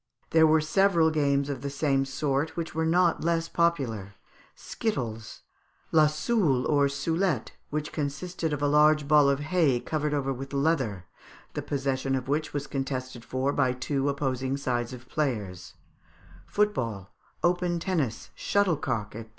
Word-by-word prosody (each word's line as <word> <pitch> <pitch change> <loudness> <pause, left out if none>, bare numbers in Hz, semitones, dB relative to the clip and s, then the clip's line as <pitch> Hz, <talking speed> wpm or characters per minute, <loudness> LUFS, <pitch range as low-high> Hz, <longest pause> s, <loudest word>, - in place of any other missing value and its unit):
There 160 -1 +6
were 155 0 +4
several 165 0 +3
games 140 -2 +1
of 140 -4 -4
the 140 - -3
same 140 -1 +1
sort, 140 +3 -1
which 165 -1 -3
were 160 +1 0
not 175 +1 +3
less 165 0 +1
popular. 125 - -1 0.4
Skittles; 115 - -4 0.5
la 155 -1 +6
Soule 150 - +1
or 145 -2 +3
Soulette, 150 - -1 0.2
which 150 0 -3
consisted 160 +3 -3
of 145 -1 -2
a - - +3
large 150 0 +4
ball 150 -1 +6
of 140 0 +1
hay 150 -5 +2
covered 150 +2 -2
over 135 -1 -1
with 135 +2 -8
leather, 135 - 0 0.5
the - - -3
possession 135 -1 -1
of 130 -1 -3
which 150 +3 -1
was 145 -1 -3
contested 130 -3 -4
for 130 +3 -1
by 130 -3 +2
two 135 +2 -1
opposing 135 -1 -1
sides 120 -3 -2
of 125 0 -10
players; 105 -13 -3 0.7
Football; 115 - -1 0.3
open 175 0 +1
Tennis; 160 - -2
Shuttlecock, 145 - 0
&c. 115 +1 -7
140 Hz, 150 wpm, -27 LUFS, 130-160 Hz, 0.7 s, There